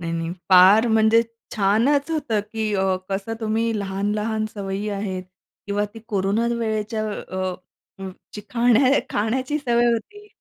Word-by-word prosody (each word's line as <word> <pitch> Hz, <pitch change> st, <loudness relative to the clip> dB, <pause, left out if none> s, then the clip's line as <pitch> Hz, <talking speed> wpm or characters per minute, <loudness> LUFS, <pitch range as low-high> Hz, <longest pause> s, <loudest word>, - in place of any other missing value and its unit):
नाही, 165 Hz, -1 st, -4 dB
नाही 165 Hz, 0 st, -3 dB, 0.2 s
फार 190 Hz, +5 st, +7 dB
म्हणजे 220 Hz, +1 st, +4 dB, 0.3 s
छानच 235 Hz, +9 st, +2 dB
होतं 280 Hz, -10 st, 0 dB
की 220 Hz, -1 st, -2 dB
अ, 190 Hz, -1 st, +1 dB
कसं 195 Hz, +3 st, -3 dB
तुम्ही 225 Hz, 0 st, 0 dB
लहान-लहान 210 Hz, +3 st, -2 dB
सवयी 200 Hz, 0 st, -4 dB
आहेत 195 Hz, -2 st, -3 dB, 0.4 s
किंवा 205 Hz, 0 st, 0 dB
ती -, -, -8 dB
कोरोना 205 Hz, +2 st, 0 dB
वेळेच्या. 220 Hz, -1 st, -2 dB, 0.2 s
अ, 185 Hz, -1 st, -3 dB, 0.8 s
चिकन 235 Hz, +3 st, +1 dB
हे 260 Hz, +1 st, +4 dB
खाण्या 280 Hz, -, +4 dB
खाण्याची 255 Hz, +7 st, -1 dB
सवय 240 Hz, -4 st, +1 dB
होती 415 Hz, -, -5 dB
215 Hz, 140 wpm, -22 LUFS, 195-230 Hz, 0.8 s, फार